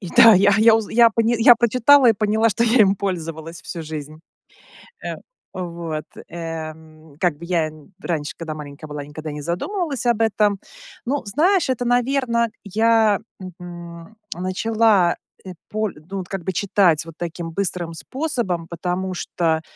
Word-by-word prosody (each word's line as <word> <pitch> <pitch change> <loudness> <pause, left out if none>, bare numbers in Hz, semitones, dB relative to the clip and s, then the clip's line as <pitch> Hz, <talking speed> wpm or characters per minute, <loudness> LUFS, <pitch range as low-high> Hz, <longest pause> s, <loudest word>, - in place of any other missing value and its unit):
и 185 - -7
да, 230 -2 +9
я 200 +2 +5
я 225 +1 +6
узн 220 -2 -4
я 235 0 +6
поня 230 +1 +1
я 240 +1 +8
прочитала 245 +3 +5
и - - +4
поняла, 220 +2 +1
что 225 +3 0
я 235 +1 +4
им 195 -1 +5
пользовалась 165 -3 -5
всю 170 - -6
жизнь. 155 0 -7 0.8
Эм. - - -6 0.3
Вот, 170 -4 -5 0.3
эм, 160 -2 -8
как 175 -6 +1
бы 170 - -9
я 170 -3 0
нь 155 +3 -17
раньше, 160 -6 -3
когда 160 -2 -5
маленькая 150 0 -9
была, 150 -1 -6
никогда 155 +2 -7
не 150 0 -6
задумывалась 275 - -3
об 235 -2 +2
этом. 210 -2 +2 0.5
Ну, 275 0 -2
знаешь, 325 - +2
это, 250 -1 0
наверно, 245 -1 +1
я, 220 0 +3 0.2
мгм, 175 +1 -10 0.2
начала 190 +1 +2 0.3
эт 185 -1 -9 0.2
поль 215 -1 -2 0.2
ну 195 - -3
вот, 185 -2 -6
как 195 -3 -5
бы, 190 - -2
читать, 180 -4 +2
вот 165 -2 -11
таким, 170 0 -5
быстрым 175 -3 -2
способом, 230 - -3
потому 180 +2 -3
что, 160 -2 -1
185 Hz, 160 wpm, -21 LUFS, 165-225 Hz, 0.8 s, да